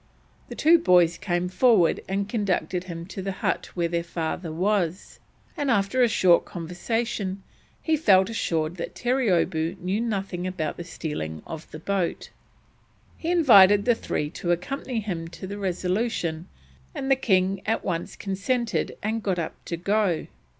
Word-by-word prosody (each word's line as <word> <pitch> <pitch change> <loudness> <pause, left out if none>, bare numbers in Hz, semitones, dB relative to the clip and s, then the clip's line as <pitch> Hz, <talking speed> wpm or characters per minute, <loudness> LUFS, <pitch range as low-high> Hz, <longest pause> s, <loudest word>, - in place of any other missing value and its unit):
The - - -7
two 330 +2 +5
boys 175 - +4
came 180 -2 -1
forward 195 -2 +3
and 195 +1 -1
conducted 190 -4 -1
him 170 -2 -6
to 195 +1 -7
the 195 0 -3
hut - - -2
where 170 -1 +1
their 170 0 -1
father 170 0 -4
was, 185 0 -1 0.4
and 290 -4 -1
after 215 +2 +2
a 245 - +6
short 185 -6 +4
conversation 195 +3 -3 0.4
he 320 - +2
felt 190 -10 +4
assured 170 -6 -1
that 170 - -5
Terreeoboo 185 -9 +1
knew 190 +5 -1
nothing 195 -5 -2
about 165 -5 -3
the 175 - -5
stealing 150 - -5
of 160 -1 -8
the - - -8
boat. 185 +1 -2 0.8
He 330 - -4
invited 205 - +6
the 240 - +5
three 150 -8 -3
to 175 - -5
accompany 235 +6 -2
him 175 -6 -4
to 170 +3 -9
the 200 +2 -6
Resolution, 180 -2 -1 0.5
and 270 0 -2
the - - +7
king 190 -6 +1
at 225 - 0
once 170 -2 -3
consented 215 +5 -2
and 220 +2 -1
got 190 -3 -1
up 165 -2 -3
to 170 - -3
go. 195 -1 +1
190 Hz, 155 wpm, -25 LUFS, 170-220 Hz, 0.8 s, the